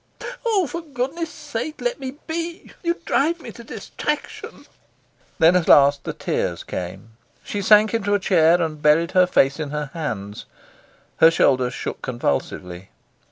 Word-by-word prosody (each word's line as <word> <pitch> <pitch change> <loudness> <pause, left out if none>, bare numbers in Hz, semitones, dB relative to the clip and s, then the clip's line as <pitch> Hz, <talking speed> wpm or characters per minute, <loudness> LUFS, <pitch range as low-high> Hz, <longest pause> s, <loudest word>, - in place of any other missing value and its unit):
"Oh, 430 -6 +2
for 335 +4 -5
goodness 300 +3 -4
sake, 300 -1 -6
let - - -2
me 265 0 -6
be. 335 +1 -5
You 340 -1 0
drive 330 +5 +1
me - - -9
to 235 - -12
distraction." - - -5 0.7
Then 165 +3 +5
at 180 -3 +1
last 140 0 +5
the - - -2
tears - - -2
came. 90 +5 -7 0.3
She 205 - -4
sank 210 +2 +5
into 205 -3 +1
a - - +1
chair, 175 -2 +4
and 155 -2 -4
buried 160 +3 +3
her 185 -1 +4
face 140 -4 +2
in 150 -2 -3
her 150 -1 -4
hands. 105 -11 -5 0.7
Her 160 - +7
shoulders 130 -6 +2
shook - - -5
convulsively. 90 - -3
180 Hz, 155 wpm, -22 LUFS, -, 0.7 s, Her